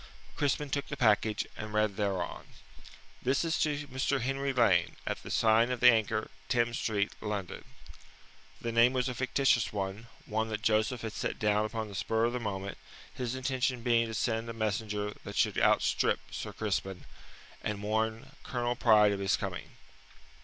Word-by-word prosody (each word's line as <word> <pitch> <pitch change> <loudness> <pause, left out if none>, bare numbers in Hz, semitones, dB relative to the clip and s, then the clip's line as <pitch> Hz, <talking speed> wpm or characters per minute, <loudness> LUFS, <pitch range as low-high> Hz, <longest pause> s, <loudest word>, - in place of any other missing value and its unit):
Crispin 145 0 0
took 140 0 -1
the 140 - -5
package, 110 -3 +2
and 105 0 -6
read 105 -2 +2
thereon: 95 -4 -2 0.7
This 130 +5 +1
is 165 0 0
to 145 -1 0
Mr. 130 +1 0
Henry 135 +2 -1
Lane, 100 -10 +3
at - - -3
the - - -9
sign 115 +2 +4
of 125 -1 -2
the 125 +1 +8
Anchor, 110 -1 0 0.2
Thames 120 -1 +1
Street, 105 -2 0
London. 105 -4 -4 1.0
The 120 - -3
name 115 +2 +5
was 125 -1 0
a 125 - -2
fictitious 130 -2 +2
one 100 +2 -4 0.2
one 110 +1 -1
that 105 -1 -4
Joseph 110 +3 +2
had 110 -2 -5
set - - -3
down 105 0 +2
upon 110 0 -3
the 105 - -10
spur 110 +3 0
of 120 - 0
the 125 - -1
moment, 100 -3 -4 0.3
his 125 0 -3
intention 130 -2 -1
being 115 -1 +3
to 110 - -5
send 115 0 -1
a - - -4
messenger 105 -1 -2
that - - -7
should - - +2
outstrip - - +3
Sir - - -5
Crispin, 95 -3 -3 0.6
and 105 -1 -3
warn 110 +1 -1
Colonel 120 -1 -2
Pride 110 -4 +5
of 100 - -2
his 95 -1 +1
coming. - - -5
110 Hz, 175 wpm, -31 LUFS, 105-125 Hz, 1.0 s, the